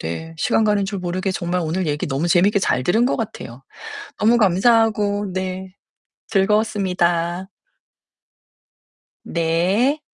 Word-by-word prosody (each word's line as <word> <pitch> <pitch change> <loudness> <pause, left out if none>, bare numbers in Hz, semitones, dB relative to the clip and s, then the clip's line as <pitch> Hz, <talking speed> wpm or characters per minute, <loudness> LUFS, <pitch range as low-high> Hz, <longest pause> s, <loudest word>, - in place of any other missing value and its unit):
네, 160 - -6
시간 220 - +1
가는 205 -2 +2
줄 200 -1 -4
모르게 185 +2 -2
정말 180 -1 -2
오늘 165 +2 -2
얘기 150 0 -2
너무 135 +5 -1
재밌게 195 +4 +3
잘 130 -9 0
들은 220 - +2
것 - - 0
같아요. 135 - -7 0.6
너무 225 +3 +4
감사하고 205 0 +2
네 185 0 -5 0.5
즐거웠습니다. 190 -4 0 1.8
네. 180 - +1
185 Hz, 245 characters per minute, -20 LUFS, 170-210 Hz, 1.8 s, 너무